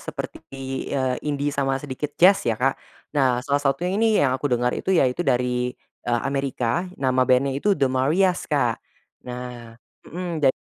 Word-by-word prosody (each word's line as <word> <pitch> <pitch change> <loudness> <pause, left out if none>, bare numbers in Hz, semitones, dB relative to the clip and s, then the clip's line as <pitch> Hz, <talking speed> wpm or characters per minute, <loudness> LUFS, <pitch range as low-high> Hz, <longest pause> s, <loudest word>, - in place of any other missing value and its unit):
seperti, - - -6 0.5
eee, 130 -2 0
indie 145 -1 -1
sama 135 -1 0
sedikit 145 +1 -5
jazz 190 +3 +6
ya 115 -2 -1
Kak. 135 +1 +2 0.4
Nah, 130 -4 +3
salah 145 0 +1
satunya 155 +7 0
ini 220 0 +3
yang 130 -2 +3
aku 145 +1 -2
denger 125 0 +1
itu 190 - -1
yaitu 135 -2 +2
dari, 125 -3 +1 0.3
eee, 120 -1 +1
Amerika, 135 +3 -1
nama 130 -1 +2
bandnya 130 +2 +2
itu 200 +6 +2
The 135 - +3
Marias, 160 +9 +2
Kak. 130 -6 +1 0.4
Nah 125 -2 -8 0.3
mhm, 170 -2 -4
ja 135 - +6
135 Hz, 165 wpm, -23 LUFS, 125-150 Hz, 0.5 s, jazz